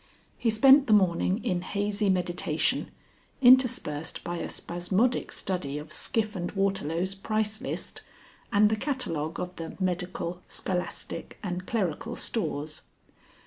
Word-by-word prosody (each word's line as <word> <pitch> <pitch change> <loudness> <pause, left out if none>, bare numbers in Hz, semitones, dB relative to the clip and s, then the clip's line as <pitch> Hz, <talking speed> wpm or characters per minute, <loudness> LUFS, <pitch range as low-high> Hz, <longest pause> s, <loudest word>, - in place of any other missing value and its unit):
He 235 - 0
spent 270 +5 +7
the 220 - +5
morning 190 +1 +3
in 180 -2 0
hazy 205 +2 0
meditation, 175 -3 0 0.5
interspersed 250 - +4
by 175 0 -3
a - - -4
spasmodic 190 +8 0
study 160 -7 -2
of 150 +1 -7
Skiff 215 -1 0
and 175 -1 -3
Waterlow's 190 -2 0
price 215 +2 -2
list, 265 - -4 0.5
and 210 +1 +5
the 220 - +2
catalogue 210 - -2
of 180 0 -4
the 165 -1 -7
Medical, 180 -1 -2
Scholastic, 180 -1 -4
and 180 -1 -4
Clerical 220 +1 -1
Stores. 155 -8 -2
190 Hz, 125 wpm, -28 LUFS, 175-215 Hz, 0.5 s, spent